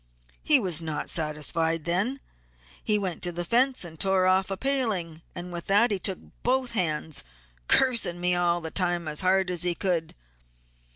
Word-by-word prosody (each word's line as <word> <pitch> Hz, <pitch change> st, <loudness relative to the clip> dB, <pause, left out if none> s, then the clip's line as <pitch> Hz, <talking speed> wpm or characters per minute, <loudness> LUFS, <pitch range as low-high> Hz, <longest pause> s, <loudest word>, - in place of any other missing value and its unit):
He 295 Hz, -3 st, +5 dB
was 180 Hz, -7 st, +1 dB
not 155 Hz, -2 st, -4 dB
satisfied 160 Hz, +1 st, -1 dB
then; 200 Hz, +11 st, 0 dB, 0.6 s
he 215 Hz, -, +1 dB
next -, -, -3 dB
went 180 Hz, -3 st, -4 dB
to 175 Hz, -, -2 dB
the 175 Hz, 0 st, -4 dB
fence 250 Hz, +2 st, +2 dB
and 160 Hz, -2 st, -11 dB
tore 190 Hz, -1 st, +2 dB
off 185 Hz, +1 st, +2 dB
a 195 Hz, -, -3 dB
paling, 210 Hz, -, +1 dB
and 175 Hz, 0 st, -6 dB
with 170 Hz, 0 st, -6 dB
that 210 Hz, +4 st, +4 dB
he 200 Hz, -, 0 dB
took 190 Hz, -1 st, -1 dB, 0.2 s
both 255 Hz, 0 st, 0 dB
hands, 160 Hz, -6 st, -2 dB, 0.4 s
'cursing' 235 Hz, -9 st, +3 dB
me 180 Hz, 0 st, +1 dB
all 175 Hz, -1 st, +1 dB
the 160 Hz, -1 st, -4 dB
time 175 Hz, -3 st, 0 dB
as 150 Hz, 0 st, -2 dB
hard 185 Hz, 0 st, +2 dB
as 175 Hz, -2 st, -3 dB
he 175 Hz, -1 st, 0 dB
could. 175 Hz, -4 st, -2 dB
180 Hz, 180 wpm, -26 LUFS, 170-200 Hz, 0.6 s, He